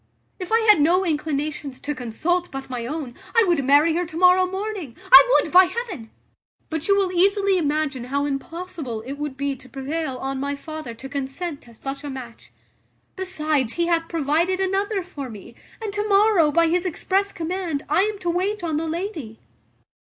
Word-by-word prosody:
If 365 +1 -6
I 450 - +5
had 425 -8 +6
no 360 +5 +3
inclinations 300 -3 -2
to 295 - -3
consult 315 +9 -1
but 270 -1 -7
my 240 -2 -4
own, 290 -3 -5 0.2
I 460 - +6
would 340 -6 +2
marry 290 +5 +5
her 350 - +1
to 320 - -8
morrow 365 +1 +5
morning: 380 - -5
I - - +12 0.2
would, - - -7
by 370 +1 +8
heaven! 360 - -5 0.6
but 320 0 -3
you 395 -1 +4
will 385 -2 +1
easily 390 +1 +3
imagine 295 -5 -1
how 280 +3 -1
impossible 290 -4 -5
it 275 +4 -7
would 295 -3 -4
be 280 0 -1
to 255 0 -16
prevail 275 0 -3
on 270 +1 -3
my 280 +1 -2
father 310 -5 -7
to 245 +4 -9
consent 280 +3 -5
to 235 - -17
such 270 +5 -6
a 290 - -5
match; 255 -4 -9 0.6
besides, 310 - -1
he 340 - 0
hath 330 -1 0
provided 330 +4 +1
another 390 +1 0
for 285 -7 -7
me; 215 0 -11 0.3
and 435 -3 -5
to 415 +1 -2
morrow, 400 -5 +5
by 335 +3 +4
his 350 +2 +1
express 385 +3 0
command, 335 -3 -3
I 305 +5 +3
am 425 +1 0
to 350 - -1
wait 380 +3 -1
on 320 -3 -1
the 325 +1 -2
lady." 320 - -5
320 Hz, 190 wpm, -23 LUFS, 275-370 Hz, 0.6 s, I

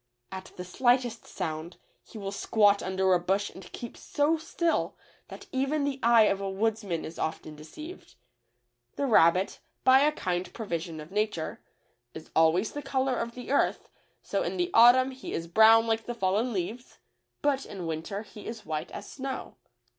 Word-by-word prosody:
At 190 0 -8
the 180 - -7
slightest 240 +3 +1
sound 160 +2 -5 0.3
he - - -12
will 195 -2 -4
squat 205 0 +3
under 190 0 +1
a 180 - +4
bush 195 +3 0
and 185 -1 -12
keep 235 - -8
so 295 +3 +1
still 325 +1 -1 0.3
that - - -10
even 275 +3 0
the 280 -1 -2
eye 235 -1 +6
of 200 -2 +1
a 195 - -2
woodsman 205 -3 -1
is 165 - -9
often 155 -1 -4
deceived. 305 - -11 0.8
The 280 - -1
rabbit, 185 -6 +4 0.2
by 260 +1 +7
a 295 +2 +4
kind 180 -9 -3
pro 225 -1 -5
vision 165 -3 -4
of 155 +3 -10
nature, 210 -6 -2 0.6
is 160 - -10
always 165 +6 +3
the 290 - -5
color 265 -1 0
of 235 0 -4
the 250 +1 -7
earth, 285 - +1 0.3
so - - -1
in - - -2
the 355 0 0
autumn 250 +3 +7
he 260 0 -8
is 165 - -3
brown 220 +5 +6
like 225 0 -1
the 240 - -3
fallen 210 +4 0
leaves, 215 +5 -5 0.5
but 280 -2 +1
in 190 -4 -7
winter 165 +6 -4
he 210 0 -12
is 225 -1 -7
white 155 +1 -3
as - - -8
snow. 270 -1 -6
215 Hz, 175 wpm, -28 LUFS, 180-255 Hz, 0.8 s, by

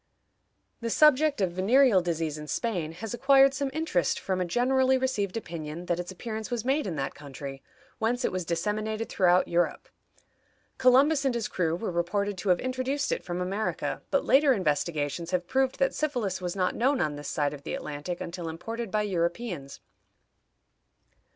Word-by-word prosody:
The 230 -1 -3
subject 300 0 +4
of 185 -2 +1
venereal 205 +3 +4
disease 165 -3 -2
in 150 - -8
Spain 175 -6 -2
has 215 +6 -6
acquired 270 +2 +5
some 275 0 -1
interest 285 - 0
from 185 -1 -2
a - - +1
generally 260 +6 +2
received 230 -7 -1
opinion 165 -4 -6
that 175 0 -1
its 175 +1 -5
appearance 220 +3 -5
was 240 -2 -3
made 270 -1 +1
in 175 - -3
that 135 -2 -3
country, 140 -1 -8 0.4
whence 245 +3 0
it - - 0
was 185 0 -2
disseminated 215 +6 -2
throughout 180 -1 +3
Europe. 175 0 0 0.9
Columbus 270 +4 +5
and 265 -3 +1
his 235 -2 -1
crew 165 -3 0
were 185 +2 -3
reported 195 +4 -1
to 200 - -2
have 180 - +4
introduced 255 +2 -1
it - - -1
from 175 0 -4
America, 195 +4 -2
but - - +1
later 275 0 +5
investigations 155 - -1
have 180 -1 0
proved 265 +5 +1
that 270 - +2
syphilis 245 -12 -2
was 180 0 -3
not 185 -2 +1
known 265 +3 +1
on 150 -3 0
this 145 0 -7
side 145 -1 0
of 145 - -9
the - - -4
Atlantic 150 +4 -5
until 170 -1 -5
imported 225 +7 -5
by 210 +1 0
Europeans. 175 -5 -3
195 Hz, 175 wpm, -28 LUFS, 170-255 Hz, 0.9 s, acquired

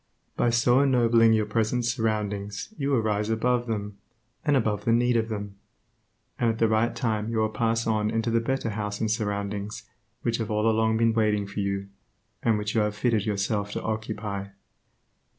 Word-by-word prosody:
By 120 - +2
so 120 +2 +4
ennobling 120 -4 +4
your 110 -1 +2
present 115 +3 0
surroundings 105 - -2
you 140 -5 -2
will 130 -5 +3
rise 105 0 0
above 120 +2 +1
them, 105 -2 -4 0.4
and 145 -2 +3
above 105 -4 0
the 115 - +1
need 120 +1 +3
of 115 0 +1
them, 100 -2 -5 0.8
and 120 - +2
at 115 - -1
the 115 - +3
right 110 +2 +1
time 110 -2 -1
you 115 - -2
will 110 0 +2
pass 115 +1 0
on 110 -1 +1
into 115 +1 0
the 115 - +3
better 115 -1 -1
house 105 0 -3
and 110 -1 0
surroundings 100 -1 -3 0.4
which 115 -1 0
have 115 -1 -3
all 105 +1 +1
along 110 0 +2
been 115 0 +3
waiting 105 -2 +1
for 100 +1 -6
you, 100 0 -2 0.5
and 115 -2 +2
which 105 0 -3
you 110 - +3
have 105 0 -1
fitted 110 -1 +1
yourself 100 0 -1
to - - -4
occupy. 110 -2 -3
110 Hz, 185 wpm, -26 LUFS, 105-115 Hz, 0.8 s, so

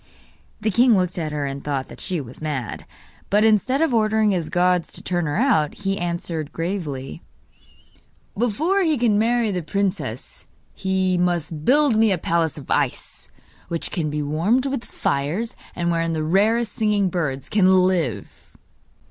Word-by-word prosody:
The 215 0 +1
king 235 +1 +5
looked 180 -1 -1
at 155 -2 -3
her 145 -1 -2
and 140 0 -5
thought 140 -2 -2
that - - -11
she 180 -3 -1
was 130 -1 -9
mad; 140 -8 -4 0.4
but, 210 +2 +3
instead 225 +7 +3
of 320 - +1
ordering 215 -1 +3
his 175 -5 -1
guards 180 -1 +1
to - - -6
turn 175 -3 -1
her 145 - -2
out, 205 - +2
he 195 0 -2
answered 170 -3 -3
gravely: 165 -7 -4 1.1
'Before 290 - +1
he 320 -5 +2
can 225 -4 +2
marry 230 0 +2
the 180 -2 -2
princess 195 +4 -3 0.3
he 190 -1 0
must 165 -3 -1
build 280 -3 +4
me 220 -1 +4
a 190 - +2
palace 165 -1 0
of 140 - -9
ice, - - -2 0.4
which 165 -1 -3
can 160 -5 -1
be 150 0 -2
warmed 175 - +1
with 270 -3 -2
fires, 160 +12 -2 0.2
and 170 0 0
wherein 165 0 0
the 155 -1 -1
rarest 210 +7 +2
singing 210 -4 +1
birds 150 -7 -3
can 200 -3 +3 0.2
live! 155 - -2
180 Hz, 165 wpm, -22 LUFS, 155-220 Hz, 1.1 s, king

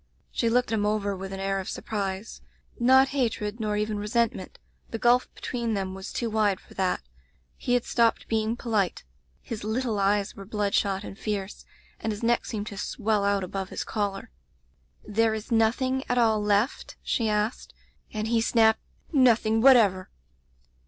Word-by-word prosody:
She 230 - 0
looked 245 +1 +2
him 220 -2 +1
over 205 -1 0
with 190 0 -7
an 195 - -5
air 195 0 -1
of 190 - -5
surprise 200 -1 -4 0.2
— - - -21
^not 265 +2 +6
hatred, 230 -5 -1
nor 210 -1 -1
even 210 0 -1
resentment; 210 -2 -1 0.3
the 225 - -4
gulf 240 +2 +3
between 235 -3 -2
them 190 -1 -3
was 190 0 -7
too 235 - -2
wide 215 -3 +1
for - - -18
that. 185 - 0 0.5
He 245 - 0
had 245 - 0
stopped 230 -1 +2
being 220 0 0
po 235 - -6
lite. 200 -5 +1 0.4
His 220 -3 -6
little 220 0 -1
eyes 200 0 +1
were 200 - -9
bloodshot 200 -1 0
and 195 - -9
fierce, 205 -2 -4 0.3
and 220 - -2
his 210 +2 -6
neck 235 +1 +2
seemed 210 -2 -3
to 200 -2 -7
swell 210 0 0
out 200 -1 +1
above 190 +1 -4
his - - -4
collar. 200 -2 -3 0.4
"* - - -41
There 220 +1 +2
is 220 +1 -7
nothing 255 +4 +2
at 245 - +1
all 220 -3 +3
left 210 +5 0
?' - - -42
she 225 -2 0
asked, 210 +3 -1 0.4
and 215 0 -3
he 230 0 +2
snapped 220 -1 +3 0.2
— - - -32
'Nothing 230 -5 +4
whatever!' 220 -8 +5
215 Hz, 180 wpm, -26 LUFS, 200-230 Hz, 0.5 s, ^not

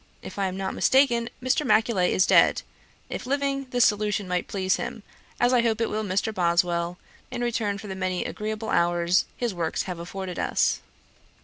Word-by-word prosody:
If - - -8
I 195 - +1
am 185 0 -5
not 190 0 -3
mistaken, 245 -3 +3
Mr. 255 +4 +1
Macaulay 220 -8 +2
is 185 - +3
dead; - - +4 0.4
if 250 - -6
living, 275 0 -1
this 245 -2 +3
solution 210 -1 0
might 180 0 -1
please 190 -1 0
him, - - -6 0.4
as 245 +1 +3
I 245 - +5
hope 225 -1 0
it 230 - 0
will 215 +1 -1
Mr. 205 +3 -1
Boswell, 170 -1 +1 0.3
in - - -5
return 220 -4 -1
for 200 - -10
the 195 - -5
many 185 +2 -2
agreeable 220 -2 -4
hours 175 +1 +2
his 240 -4 -1
works 170 -3 -2
have 180 -3 -6
afforded 180 +1 -6
us.' - - +1
205 Hz, 185 wpm, -25 LUFS, 180-235 Hz, 0.4 s, I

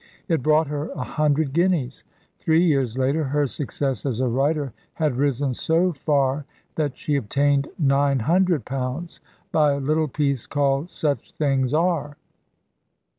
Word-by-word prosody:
It 165 -7 +1
brought 155 +3 +3
her 145 +1 -4
a - - -4
hundred 150 -2 0
guineas. 170 -7 0 0.3
Three 165 +2 +3
years 135 -7 +1
later 135 +4 +1
her 145 +2 +1
success 135 0 -2
as 125 -5 -2
a 130 - +1
writer 140 +2 0 0.2
had 155 -5 0
risen 140 0 0
so 170 +7 +1
far 140 -1 0 0.3
that 145 -5 -2
she 150 - -1
obtained 140 +3 +1
nine 140 -2 +2
hundred 170 - +2
pounds 135 +6 -4 0.3
by 150 -2 +3
a 140 - -2
little 155 +3 +1
piece 140 -3 -1
called 140 +2 0
"Such 145 -8 -2
Things 135 -4 0
Are." 155 -2 0
145 Hz, 145 wpm, -23 LUFS, 135-155 Hz, 0.3 s, brought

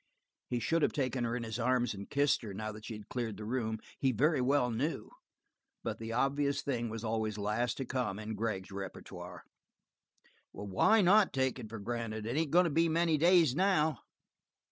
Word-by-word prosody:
He 120 - 0
should 165 +8 +1
have - - +2
taken 130 -3 -1
her 115 +1 -1
in 125 - -3
his 110 +1 -4
arms 125 0 +1
and 100 0 -8
kissed 145 0 +2
her, 105 -5 -7
now 110 +1 -4
that 105 +1 -10
she 115 - -5
had 105 -1 -11
cleared 115 -4 -3
the 105 - -7
room, 110 -1 -1 0.2
he 135 - +2
very 145 +5 +2
well 125 -1 +2
knew, 135 +8 -2 0.7
but - - -3
the 115 0 -5
obvious 140 +4 +1
thing 120 -4 -2
was 110 0 -6
always 110 -2 -1
last 105 +4 -1
to 135 - -3
come 125 -6 -2
in 110 +1 -5
Gregg's 105 -3 -3
repertoire. 95 -1 -8 1.1
"Why 105 - +3
not 200 +2 +5
take 130 -1 0
it 110 -3 -8
for 115 - -6
granted? 110 0 -4
It 115 +3 -2
ain't 160 0 +1
going 175 +5 +5
to 170 - 0
be 165 +3 +3
many 165 -1 +2
days, 170 -4 +5
now." 160 - +2
120 Hz, 195 wpm, -32 LUFS, 110-145 Hz, 1.1 s, not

